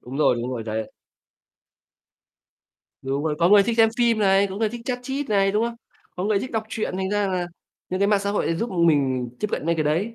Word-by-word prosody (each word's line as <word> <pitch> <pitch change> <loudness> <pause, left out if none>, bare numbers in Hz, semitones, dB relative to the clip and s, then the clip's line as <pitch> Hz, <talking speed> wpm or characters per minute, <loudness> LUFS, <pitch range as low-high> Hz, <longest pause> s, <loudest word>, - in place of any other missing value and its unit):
Đúng 130 +3 -8
rồi, 150 - +4
đúng 120 +2 -3
rồi 120 -3 -4
đấy. 110 0 -4 2.1
Đúng 135 +2 -2
rồi. 155 -1 0
Có 170 +1 +4
người 205 0 +7
thích 230 +2 -1
xem 225 -1 +6
phim 235 -2 +3
này, 195 -1 +4
có 190 0 -7
người 220 +1 +1
thích 235 +1 -7
chat 250 0 -2
chít 270 +2 -4
này, 195 -2 +2
đúng 215 +2 +1
không? 235 0 -3 0.4
Có 180 - -3
người 210 -1 +2
thích 255 - -5
đọc 220 -1 0
truyện 220 -4 -3
thành 190 0 -2
ra 205 -1 +1
là 180 -2 -1 0.4
những 185 +1 -3
cái 200 - +4
mạng 205 -1 +3
xã 200 0 -2
hội 205 - 0
này 165 - 0
giúp 230 +7 -3
mình 140 -8 +2
tiếp - - 0
cận - - -3
mấy 170 - +2
cái 155 -2 -1
đấy. 175 +10 0
195 Hz, 250 wpm, -23 LUFS, 155-215 Hz, 2.1 s, người